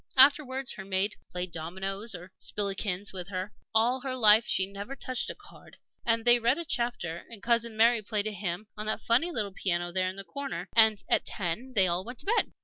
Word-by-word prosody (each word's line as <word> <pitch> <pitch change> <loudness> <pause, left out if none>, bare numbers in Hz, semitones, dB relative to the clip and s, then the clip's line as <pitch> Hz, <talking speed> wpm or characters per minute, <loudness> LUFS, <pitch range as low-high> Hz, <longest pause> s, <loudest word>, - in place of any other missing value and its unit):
Afterwards 265 -1 +4
her 190 - -7
maid 195 +2 0
played 180 0 -4
dominoes 190 +6 -3
or 180 +1 -10
spillikins 200 -1 -2
with 180 -2 -5
her 185 +1 -5 0.2
all 240 +4 +2
her 260 -1 -4
life 220 -1 +6
she 190 - +2
never 200 +7 -7
touched 255 -3 -3
a - - -5
card - - -16 0.3
and 230 -1 +1
they 240 0 +7
read 240 +4 +2
a 340 - -3
chapter, 235 - -2
and 225 -4 -9
Cousin 235 -1 +1
Mary 230 +1 +5
played 210 0 -1
a 215 - -1
hymn 200 0 -4
on 215 0 -5
that 215 - +1
funny 240 +9 +3
little 215 -12 -1
old 190 - -22
piano 175 -2 -1
there 185 +1 0
in 185 - -7
the 195 - -8
corner, 195 -3 -6
and 220 -2 +6
at - - +2
ten 210 +8 -3
they 190 -3 +6
all 175 +1 +1
went 245 +4 -8
to 290 - -5
bed. 465 +3 +1
210 Hz, 220 wpm, -29 LUFS, 190-240 Hz, 0.3 s, they